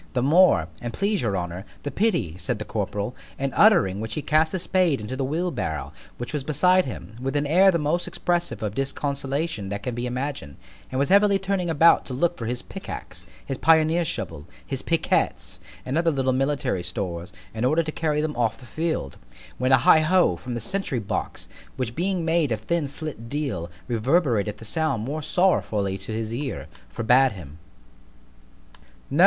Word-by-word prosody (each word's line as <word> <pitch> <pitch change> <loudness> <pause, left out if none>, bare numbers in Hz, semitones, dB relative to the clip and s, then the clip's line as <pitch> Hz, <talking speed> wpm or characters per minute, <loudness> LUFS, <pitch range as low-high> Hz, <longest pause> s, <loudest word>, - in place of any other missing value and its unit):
The 125 - +1
more, 155 - +5
an' 120 - -3
please 200 0 0
your 100 -5 0
honour, 90 +1 -4 0.2
the 145 - -3
pity, 170 - 0
said 125 +3 -2
the 110 - -6
corporal; 105 +2 -3 0.2
in 135 0 -2
uttering 170 - +5
which 110 +1 -4
he 150 - -3
cast 155 +1 +3
his 185 -2 -2
spade 180 -8 +2
into 105 +5 -5
the 135 - -2
wheel 165 +7 -1
barrow, 80 - -4 0.2
which 120 +5 -6
was 145 -3 -1
beside 180 +6 +3
him, 110 -4 -8
with 135 +2 -2
an 145 0 +1
air 180 +6 +5
the 175 - +3
most 160 +3 0
expressive 175 -8 -1
of 105 -1 -2
disconsolation 140 -2 -2
that 100 0 -4
can 125 - -3
be 120 +1 -3
imagined, 130 - -4 0.4
and 130 - -2
was 140 +1 +1
heavily 200 +1 +5
turning 195 -2 -1
about 165 +1 +5
to 130 - -4
look 175 +6 +1
for 115 - -5
his 120 +1 -3
pickax, - - -8 0.2
his 135 - -4
pioneer's 160 +2 +4
shovel, 75 - -4 0.2
his - - -3
picquets, - - 0 0.3
and 135 +5 0
other 170 0 +3
little 135 -4 +1
military 135 -6 0
stores, 90 -2 -4 0.2
in 110 +1 -3
order 155 +6 +3
to 155 - -4
carry 150 -1 0
them 155 -1 -2
off 115 -2 0
the 130 - -14
field——when 115 - -4
a 130 - +8
heigh 130 +5 +6
ho! 165 - +3
from 120 +9 -6
the - - -2
sentry 165 - -2
box, 105 -4 -4 0.3
which 125 -3 -2
being 180 +2 -1
made 165 -4 +2
of 110 -2 -1
thin 160 +5 -1
slit 140 -5 -7
deal, 130 - -3 0.2
reverberated 120 - +1
the 115 - -10
sound 135 -2 -1
more 150 +4 -3
sorrowfully 110 - +1
to 95 +3 -7
his 110 0 -3
ear, 135 +2 -4 0.3
forbad 125 - +4
him. 80 -4 -11
135 Hz, 185 wpm, -24 LUFS, 110-165 Hz, 0.4 s, a